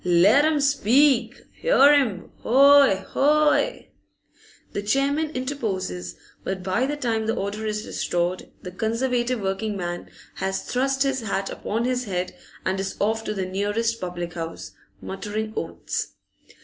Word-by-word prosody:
'Let 185 - +5
him 310 -1 +2
speak! 275 -2 +3 0.2
'Ear 295 - +6
him! 230 -11 +1
Hoy! 275 -5 +5
Hoy!' 300 - +2 0.8
The 200 - -2
chairman 275 +8 +1
interposes, 215 - -3 0.3
but 190 -1 -4
by 195 +8 0
the 295 +1 -3
time 225 -5 -1
that 225 - +1
order 210 +1 -3
is 210 0 -3
restored 175 +1 -2
the 180 - -6
Conservative 240 +4 -1
working 200 +1 -2
man 175 -1 -5 0.3
has 190 0 -2
thrust 270 +2 0
his 270 -2 0
hat 195 -3 -2
upon 225 +3 -2
his 250 0 -1
head 180 -3 -3 0.3
and 190 +1 0
is 195 0 -4
off 220 +2 0
to 210 - -3
the 190 -2 -2
nearest 205 +5 -1
public 175 -1 -4
house, 165 -1 -6 0.3
muttering 215 +2 -4
oaths. - - -4
220 Hz, 140 wpm, -24 LUFS, 190-270 Hz, 0.8 s, Ear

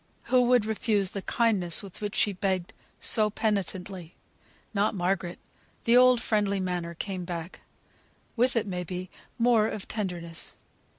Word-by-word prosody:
Who 255 - +7
would 245 -3 +4
refuse 210 -3 0
the 200 - -4
kindness 195 -7 +1
for 200 - -9
which 210 -1 -4
she 205 - +3
begged 185 -1 -1 0.3
so 215 -1 +4
penitently? 195 -4 -2 0.6
Not 205 +1 +1
Margaret. 180 -1 -1 0.5
The 235 - +4
old 250 -1 +7
friendly 205 -4 0
manner 175 -2 -3
came 185 +1 -4
back. 170 0 -6 0.8
With 250 +2 +2
it, 230 - +1
may 180 -3 -3
be, 180 +1 -6 0.3
more 230 -3 +4
of 210 -3 -5
tenderness. 175 -6 -4
200 Hz, 140 wpm, -28 LUFS, 180-220 Hz, 0.8 s, Who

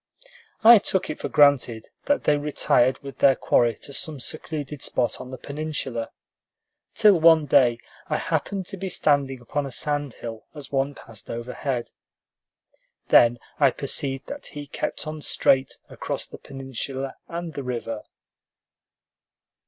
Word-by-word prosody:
I 230 0 +10
took 190 -3 -1
it - - -7
for - - -4
granted 140 -6 +3 0.2
that 285 +1 +1
they 150 - +4
retired 140 -3 +2
with 135 -2 -9
their 135 -1 +6
quarry 120 -2 +2
to 140 - -8
some 155 -2 -4
secluded 150 0 -4
spot 120 - -1
on 125 - -9
the 130 - -7
peninsula, 140 -5 -4 0.9
till 210 -5 +6
one 160 -1 +6
day 125 -5 +4 0.3
I - - 0
happened 195 -2 -2
to 195 - -6
be 190 +1 -4
standing 140 -5 +1
upon 140 +4 -3
a - - -8
sand 145 0 -1
hill 115 -2 -8
as 145 -3 -9
one 135 +1 0
passed 110 -3 -11
overhead. 120 +1 -4 1.2
Then 120 0 +6 0.2
I 140 -2 +6
perceived 135 +1 -3
that 285 0 -7
he 145 -1 -8
kept 145 - -4
on 155 0 -6
straight 135 -2 +2
across - - -4
the - - -11
peninsula 135 0 -5
and 170 -1 -5
the 140 - -4
river. 115 -4 -4
140 Hz, 145 wpm, -24 LUFS, 125-155 Hz, 1.2 s, I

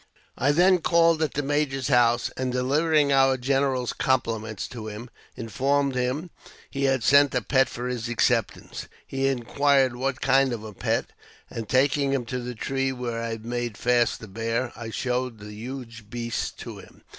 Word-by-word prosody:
I 140 +3 +2
then 180 +4 +4
called 165 -1 +3
at 155 -4 -1
the 145 - 0
major's 140 -2 -1
house, 120 -2 +3
and, 130 -1 -2
delivering 145 +4 +2
our 135 -1 +4
general's 130 -1 0
compliments 115 -5 -1
to 115 -3 -7
him, 110 +3 -8 0.2
informed 135 +5 0
him 130 +7 -2 0.4
he 140 -1 -1
had 135 -3 +1
sent 140 0 +5
a, 125 - +2
pet 135 +2 +2
for 120 +1 -5
his 120 -1 -3
acceptance. 120 -2 -1 0.2
He 135 0 -1
inquired 135 0 +2
what 130 +1 -2
kind 135 -1 +3
of 110 -2 -5
a 110 -1 -8
pet, - - -1 0.4
and, 115 -2 -6
taking 135 +1 +2
him 130 -3 -1
to 125 +2 -3
the 125 0 -6
tree 135 +3 -1
where 120 -3 -4
I 115 - -3
had 115 -1 -6
made 120 -2 -3
fast 120 -1 +2
the 110 - -10
bear, 115 +4 -2
I 115 -1 -7
showed 125 0 -2
the 105 0 -10
huge 115 -1 -8
beast 120 0 -3
to - - -8
him. - - -16
125 Hz, 180 wpm, -25 LUFS, 115-135 Hz, 0.4 s, sent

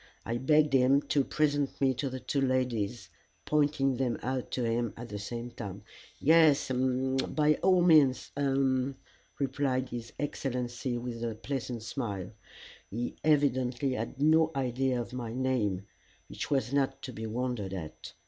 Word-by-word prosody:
I 115 +1 -2
begged 150 +2 +3
him 135 +2 +4
to 140 - +3
present 145 -1 0
me 135 -1 +3
to 130 +2 -2
the 130 0 -5
two 140 +2 -1
ladies, 120 -6 -1 0.4
pointing 145 -3 +2
them 125 -3 0
out 130 0 -2
to 125 - 0
him 115 -1 -1
at 120 +1 -8
the 105 - -5
same 120 +4 -5
time. 100 -4 -7 0.4
"Yes 155 -3 +5
uh - - +1 0.5
by 150 0 +3
all 185 -2 +4
means 150 -7 +4
uh," 135 -1 +1 0.4
replied 135 -1 0
his 120 -1 -6
Excellency 125 -3 -3
with 120 -1 -5
a 115 -2 -2
pleasant 120 -1 -4
smile. 105 -7 -4 0.6
He 120 +4 -3
evidently 135 -3 +2
had 115 +3 -4
no 160 +2 +5
idea 130 -1 0
of 120 - -5
my 120 -3 -4
name, 120 -7 0 0.4
which - - -5
was 135 -3 0
not 140 -1 0
to 130 - -6
be 110 0 -5
wondered 120 -4 -2
at. 85 -5 -7
130 Hz, 155 wpm, -30 LUFS, 120-140 Hz, 0.6 s, Yes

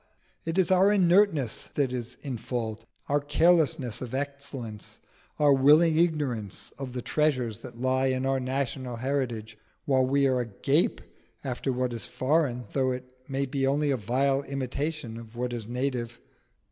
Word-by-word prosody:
it 165 +2 -2
is 190 -1 +3
our 190 +2 +5
inertness 180 - +3
that 135 -3 +1
is 125 -1 -4
in 135 -4 -4
fault, 115 -2 -4 0.2
our 145 +1 +2
carelessness 150 -4 +2
of 130 0 -5
excellence, 140 -6 -5 0.4
our 145 -2 +5
willing 150 +5 +6
ignorance 145 - 0
of 130 -3 -5
the 125 -1 -4
treasures 130 -8 0
that 120 -2 -10
lie 130 +1 +1
in 130 0 0
our 135 0 +1
national 130 -1 -2
heritage, 115 -4 -3 0.3
while 130 -2 +3
we 140 +2 +2
are 130 -2 +2
agape 115 -5 +1 0.4
after 130 +1 -2
what 125 -1 -1
is 115 - -3
foreign, 130 -3 0
though 130 -2 +2
it 125 0 -3 0.2
may 135 0 -1
be 135 0 -1
only 145 +1 +2
a - - +2
vile 135 +5 +1
imitation 140 -2 -3
of 115 0 -12
what 125 0 -2
is 115 -3 -5
native. 120 -2 -2
130 Hz, 160 wpm, -28 LUFS, 120-145 Hz, 0.4 s, willing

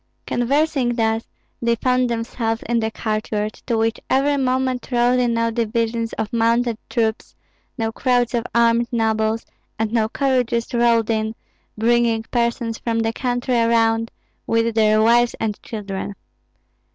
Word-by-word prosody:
Conversing 270 0 +1
thus, 225 -1 0 0.3
they 235 0 +2
found 250 +1 +1
themselves 230 0 -2
in 235 0 +1
the 220 0 0
courtyard, 215 -1 -2
to 235 -3 +1
which 225 +1 0
every 280 +2 +2
moment 260 -1 0
rode 245 +1 +3
in 240 -2 +1
now 230 0 +1
divisions 230 0 -1
of 220 0 -4
mounted 230 0 +1
troops, 225 -2 -1 0.4
now 225 -2 -1
crowds 245 0 +1
of 235 -1 0
armed 235 0 +3
nobles, 220 -1 0 0.3
and 220 0 -2
now 220 -2 +2
carriages 245 -2 0
rolled 235 -2 +3
in, 220 0 -1 0.4
bringing 230 0 +2
persons 235 -1 -1
from 230 -1 -1
the 225 0 -1
country 245 0 0
around, 230 0 +2 0.4
with 230 0 +1
their 215 -1 +3
wives 240 +1 +4
and 215 -2 -2
children. 205 -2 -5
230 Hz, 140 wpm, -21 LUFS, 225-240 Hz, 0.4 s, wives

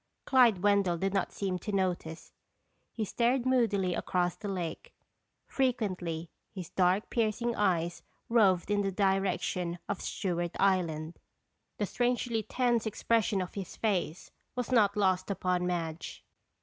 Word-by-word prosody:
Clyde 240 -8 +4
Wendell 200 -4 +3
did 195 +3 -1
not 195 -2 0
seem 190 -2 -2
to 210 - -5
notice. 180 -4 -2 0.6
He 220 - -3
stared 240 +4 +1
moodily 215 -8 +2
across 175 0 0
the 205 - -7
lake. 185 - -5 0.5
Frequently, 185 -11 -1 0.2
his 185 -5 -8
dark, 185 +3 +2
piercing 230 +1 0
eyes 175 -4 0 0.3
roved 205 -5 +3
in 205 0 +2
the 195 -1 -1
direction 185 -3 0
of 200 - -3
Stewart 175 -2 -2
Island. 170 -4 +1 0.6
The 210 - 0
strangely 245 0 0
tense 240 0 0
expression 215 -2 +1
of 180 - -9
his 195 -3 -6
face 180 -6 -2 0.2
was 250 0 -3
not 210 -4 +4
lost 185 -2 +2
upon 180 -2 0
Madge. 170 -2 -4
195 Hz, 135 wpm, -30 LUFS, 180-220 Hz, 0.6 s, Clyde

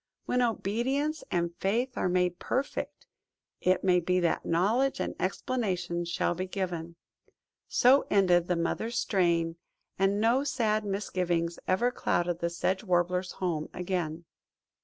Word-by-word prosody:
When 250 - +1
obedience 250 +7 0
and 170 -1 0
faith 240 +6 0
are - - 0
made 180 -1 +1
perfect, 270 +2 -3 0.5
it 185 0 +2
may 180 -2 +4
be 180 +1 +1
that 170 - +1
knowledge 220 +11 +1
and - - -2
explanation 185 -4 -1
shall 170 0 0
be 185 +2 -4
given." 175 -3 -4 0.7
So 260 +3 +4
ended 180 -3 +4
the 180 - +1
Mother's 220 +8 -2
strain, 170 -6 +1 0.4
and 195 +1 +2
no 235 +5 +3
sad 215 -6 0
misgivings 180 -4 -1
ever 235 +7 +2
clouded 175 -7 0
the 170 - 0
Sedge 185 +3 -1
Warbler's 180 -1 0
home 165 -5 -2
again. 175 -3 -3
185 Hz, 135 wpm, -29 LUFS, 175-220 Hz, 0.7 s, may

